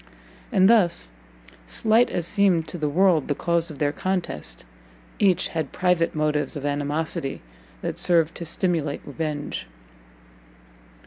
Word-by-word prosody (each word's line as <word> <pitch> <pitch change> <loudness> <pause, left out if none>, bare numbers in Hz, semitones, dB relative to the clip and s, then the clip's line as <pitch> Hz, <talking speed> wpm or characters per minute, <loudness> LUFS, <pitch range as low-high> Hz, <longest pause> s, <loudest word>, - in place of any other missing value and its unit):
And 190 -1 +5
thus, 175 - +3 0.6
slight 220 - +3
as 170 - -2
seemed 185 -4 +2
to 175 - -5
the 150 -1 0
world 170 -1 +3
the 145 - 0
cause 170 +1 0
of 150 - -8
their 145 0 +1
contest, 170 - -3 0.5
each 185 -3 +3
had 160 -4 -3
private 180 -3 +1
motives 150 0 0
of 145 - -6
animosity 145 - -2 0.4
that - - -3
served 165 -2 +3
to - - -5
stimulate 160 -3 -1
revenge. 150 0 -4
165 Hz, 130 wpm, -24 LUFS, 145-180 Hz, 0.6 s, And